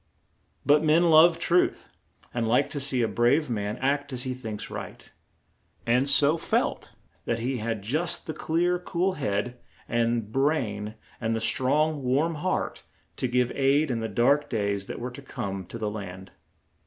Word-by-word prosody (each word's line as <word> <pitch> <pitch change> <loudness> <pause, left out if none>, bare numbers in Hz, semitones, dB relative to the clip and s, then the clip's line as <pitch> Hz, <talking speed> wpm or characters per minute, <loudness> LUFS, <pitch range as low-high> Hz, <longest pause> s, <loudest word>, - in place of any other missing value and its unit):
But 150 +2 +4
men 165 +2 +4
love 165 +2 +7
truth, 175 +1 +1 0.4
and 120 -2 -1
like 125 +5 +2
to 145 - -3
see 130 -3 0
a - - +2
brave 125 +6 +2
man 105 0 -2
act 140 +2 -1
as 125 -1 -3
he 130 - -3
thinks 110 -5 -6
right, - - -8 0.8
and 125 +4 +2
so 145 +3 +5
felt - - -1 0.3
that 115 - 0
he 125 +3 -2
had 110 -2 -3
just 155 - 0
the 160 - -4
clear, 175 +4 0
cool 180 +1 -1
head 125 - -2 0.3
and 115 -2 0
brain 110 -7 -1 0.3
and 115 0 0
the - - -1
strong 145 +6 +1
warm 140 +6 +1
heart 185 - -2 0.4
to 130 - -1
give 125 0 +1
aid 140 +2 +2
in 115 - -1
the 110 0 -3
dark 140 +5 +2
days 100 -3 -1
that - - -6
were 125 +1 -5
to 125 - -10
come 100 -8 -5
to - - -7
the 105 -2 -3
land. 95 -2 -8
125 Hz, 170 wpm, -26 LUFS, 115-150 Hz, 0.8 s, love